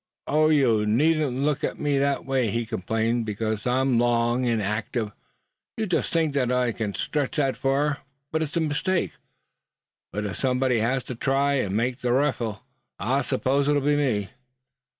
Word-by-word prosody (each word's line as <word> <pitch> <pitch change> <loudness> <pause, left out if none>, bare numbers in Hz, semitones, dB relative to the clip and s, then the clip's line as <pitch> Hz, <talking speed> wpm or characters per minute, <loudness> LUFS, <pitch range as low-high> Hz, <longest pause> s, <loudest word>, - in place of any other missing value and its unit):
"Oh! 155 +1 +3
you 120 -8 +3
needn't 145 +3 +2
look 150 0 0
at - - -2
me 145 -2 +1
that 140 0 0
way," 130 -4 +1
he 115 +3 -1
complained; 115 +2 -1
"because 110 +1 -3
I'm 130 -1 +2
long, 120 +1 +2
and 115 -2 +1
active, 105 +2 -2 0.7
you 220 - 0
just 180 -4 -1
think 160 -4 +1
I 125 -2 +1
c'n 105 -3 -4
stretch 145 -1 -2
that 135 -3 +1
far; 140 +2 0 0.3
but 160 - 0
it's 155 0 -2
a - - +2
mistake. 160 +4 -1 0.9
But 105 +1 -3
if 95 -4 -4
somebody 125 -2 +1
has 125 +4 0
to - - -6
try 135 +3 +1
and 100 -1 -1
make 125 +2 -1
the 120 -1 0
riffle, 125 -5 0 0.3
I 130 +8 0
s'pose 135 +2 0
it'll 145 0 +3
be 145 +1 +3
me." 120 -9 0
130 Hz, 170 wpm, -25 LUFS, 115-145 Hz, 0.9 s, Oh